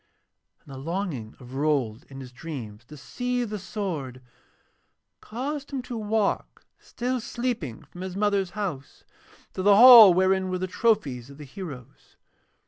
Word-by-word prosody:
And 140 - -12
the 130 - -8
longing 160 - -4
of 125 -1 -13
Rold 135 -5 -1
in 135 0 -9
his 125 -2 -10
dreams 120 -7 -8
to 150 +4 -13
see 245 - -3
the 210 -2 -5
sword 175 - -5 1.0
caused 280 +6 -5
him 270 -3 -4
to 245 - -7
walk 215 -1 -2
still 250 +1 -3
sleeping 235 - -4
from 180 - -13
his 185 -1 -6
mother's 200 -2 0
house 170 -10 -5 0.5
to - - -4
the 200 +1 +5
hall 235 -3 +10
wherein 190 0 +2
were 185 - -2
the 185 - -3
trophies 180 - 0
of 140 - -13
the 150 - -10
heroes. 140 -5 -11
185 Hz, 150 wpm, -25 LUFS, 135-215 Hz, 1.0 s, hall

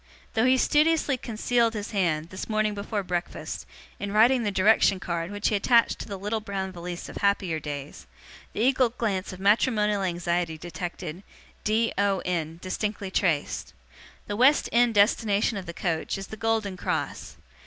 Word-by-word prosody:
Though 225 +1 +2
he 260 +1 +5
studiously 300 +1 +3
concealed 235 0 0
his 205 0 -4
hand, 170 -6 0
this 185 +3 -6
morning 215 -1 +1
before 205 0 -3
breakfast, 175 -1 -4 0.3
in 200 0 -4
writing 235 +5 +5
the 215 - 0
direction 195 0 +4
card 170 -2 -3
which 205 0 -1
he 215 - +1
attached 230 +3 +3
to - - -6
the 200 -2 -5
little 210 +3 -2
brown 195 -3 -4
valise 175 0 -6
of - - -8
happier 195 -5 +1
days, 145 -2 -7 0.5
the - - -2
eagle 255 0 +3
glance 210 -5 -2
of 185 - -9
matrimonial 210 0 +2
anxiety 175 -2 -1
detected, 175 0 -6 0.4
d, 225 +2 +1
o, 200 -2 +1
n, 165 -3 -2
distinctly 200 +1 -3
traced. 165 -7 -1 0.5
The 205 - -4
West 260 +7 +4
End 235 -1 +3
destination 205 +1 +3
of 190 -3 -6
the - - -4
coach, 170 -1 -2
is 195 - -6
the - - -3
Golden 215 -3 -1
Cross. - - -3
200 Hz, 165 wpm, -26 LUFS, 180-225 Hz, 0.5 s, he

